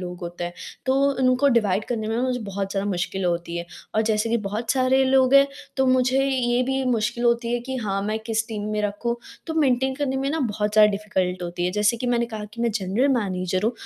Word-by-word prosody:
होते 175 -1 -6
हैं, 175 - -5 0.3
तो 260 - +3 0.3
उनको 255 +2 +4
डिवाइड 215 -5 +2
करने 220 -3 -2
में 225 - -1
मुझे 255 -1 0
बहुत 195 -1 -4
ज़्यादा 200 0 -1
मुश्किल 185 +1 -2
होती 170 -1 -1
है। 170 - -5 0.3
और 220 - +3
जैसे 215 0 0
कि 235 - +3
बहुत 220 +3 -3
सारे 260 0 +3
लोग 265 0 +4
हैं 275 0 +8 0.3
तो 265 -1 +2
मुझे 255 +1 +3
ये 250 -2 +1
भी 265 +1 -1
मुश्किल 235 -1 0
होती 235 0 +2
है 240 - 0
कि 265 +2 -5
हाँ, 195 -5 -2
मैं 215 +2 -1
किस 225 -1 0
टीम 210 -2 -4
में 210 - 0
रखूँ। 210 +4 -2 0.3
तो 320 - -3
मेंटेन 265 -3 +2
करने 265 -1 -1
में 270 +1 -1
ना 320 +2 -1
बहुत 210 -4 -1
ज़्यादा 210 0 +6
डिफिकल्ट 190 -3 -2
होती 175 0 -3
है 180 - +1
जैसे 210 +3 +2
कि 245 +2 -4
मैंने 235 -1 +1
कहा 210 -1 -4
कि 235 - -7
मैं 235 - +2
जनरल 210 +6 0
मैनेजर 185 -3 -2
हूँ, 225 - +2
225 Hz, 230 wpm, -23 LUFS, 200-255 Hz, 0.3 s, हैं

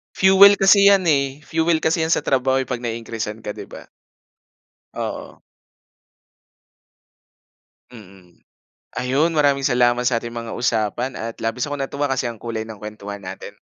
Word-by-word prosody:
Fuel 195 +1 +7
kasi 200 +1 +5
yan 200 -1 +5
eh, 140 0 -1
fuel 160 0 0
kasi 160 +1 +1
yan 160 - 0
sa 165 - +1
trabaho 130 0 +1
'pag 125 -1 -5
nai-increase'an 115 -2 -5
ka, 105 - -4
'di - - -9
ba? - - -12 1.1
Oo. - - -6 2.5
Mm. 95 -5 -16 0.6
Ayun, 135 +6 +1
maraming 140 -2 +2
salamat 125 -2 +2
sa 120 - 0
ating 115 0 -8
mga 115 -1 -6
usapan 120 +1 -1
at 115 0 -6
labis 115 +5 -3
akong 145 - -4
natuwa 140 +1 -2
kasi 130 -1 -1
ang 115 -3 -7
kulay 115 -2 -4
ng 110 -3 -10
kuwentuhan 105 -1 -8
natin. 95 0 -9
125 Hz, 145 wpm, -21 LUFS, 115-145 Hz, 2.5 s, Fuel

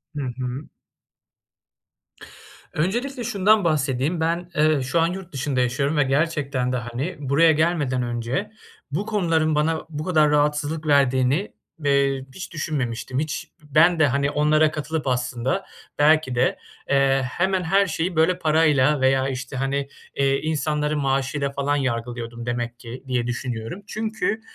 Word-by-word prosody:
Hı 145 - -3 0.2
hı. 130 +3 -4 2.1
Öncelikle 240 - -1
şundan 210 -1 +3
bahsedeyim. 150 0 0
Ben, 170 +2 -1
eee, 155 -2 +3
şu 130 +6 0
an 165 - +3
yurt 185 0 -6
dışında 135 -1 -1
yaşıyorum 140 +5 0
ve 145 - +5
gerçekten 140 -3 0
de, 125 - 0
hani, 125 +9 -4
buraya 150 +4 +4
gelmeden 150 -6 +1
önce 120 - -3 0.4
bu 185 +9 -2
konuların 165 -7 +1
bana 160 +1 0
bu 150 -1 -5
kadar 155 -4 +3
rahatsızlık 150 +1 0
verdiğini, 140 +5 +2 0.3
eee, 140 -1 +2
hiç 185 - -8
düşünmemiştim. 130 -5 -3
Hiç 150 -1 -4
ben 160 +4 +4
de, 150 - +5
hani, 140 +2 0
onlara 155 +1 +3
katılıp 155 -1 -3
aslında 125 +8 -1 0.3
belki 150 -3 +4
de, 125 +2 +2 0.3
eee, 135 -1 +3
hemen 190 +6 0
her 195 +4 +3
şeyi, 170 +1 -2
böyle, 165 +3 +3
parayla 150 -3 +3
veya, 135 0 +3
işte, 130 0 -5
hani, 135 +1 -1 0.3
eee, 135 0 +2
insanları 150 -1 -1
maaşıyla 135 0 0
falan 140 +1 0
yargılıyordum 120 -3 -3
demek 120 0 -3
ki 120 +3 -9
diye 125 -2 -1
düşünüyorum. 120 - -4
Çünkü, 220 0 -2
145 Hz, 140 wpm, -23 LUFS, 130-160 Hz, 2.1 s, ve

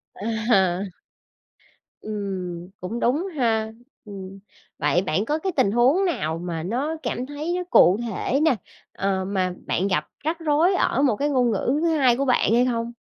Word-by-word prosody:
À. 210 -4 +1 1.2
Ừm, 185 -4 -5
cũng 215 +6 -4
đúng 285 +11 +1
ha. 220 -3 +1 0.3
Ừm, 195 -1 -9 0.4
vậy 175 - +2
bạn 190 +3 -1
có 300 +6 0
cái 380 +3 -2
tình 200 - +3
huống 260 - +3
nào 160 - -1
mà 170 -2 -4
nó 260 - -2
cảm 250 - -2
thấy 295 +5 -4
nó 360 - -2
cụ 180 - +6
thể 245 +6 -1
nè, 315 -5 +4 0.4
ờ, 190 -1 -1
mà 185 -2 -1
bạn 190 - 0
gặp 155 -6 0 0.2
rắc 320 +3 -1
rối 325 +4 +2
ở 270 - +1
một 265 -6 +3
cái 290 +6 -1
ngôn 250 -4 +2
ngữ 245 +6 0
thứ 335 - +2
2 255 -4 +4
của 275 - 0
bạn 250 -3 +2
hay 245 +2 +4
không? 235 -1 -1
230 Hz, 175 wpm, -23 LUFS, 190-275 Hz, 1.2 s, cụ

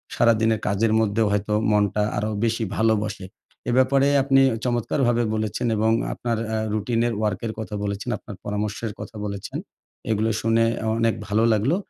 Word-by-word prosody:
সারা 115 -1 +5
দিনের 110 -1 +2
কাজের 105 +2 +1
মধ্যেও 110 0 +1
হয়তো 105 +1 0 0.2
মনটা 105 0 +2
আরো 105 +1 -1
বেশি 115 0 0
ভালোবাসে। 110 -3 0 0.4
এ - - +2
ব্যাপারে 135 +2 +4 0.2
আপনি 135 -1 +4 0.2
চমৎকারভাবে 120 0 +1
বলেছেন 110 +3 -2
এবং 110 +1 +2 0.2
আপনার 115 -2 -2 0.2
আ - - 0 0.2
রুটিন 115 +2 0
এর 120 - -1
ওয়ার্কের 110 +1 -1
এর - - -10
কথা 110 -1 -5
বলেছেন, 100 +4 -3
আপনার 105 - -10
পরামর্শের 105 +1 -3
কথা - - -8
বলেছেন। 100 -1 -5 0.5
এগুলো 110 +1 +1
শুনে 115 0 +3 0.2
আ - - -3
অনেক 115 -1 +2
ভালো 105 +2 +2
লাগলো। 110 +10 +2
110 Hz, 165 wpm, -23 LUFS, 105-115 Hz, 0.5 s, সারা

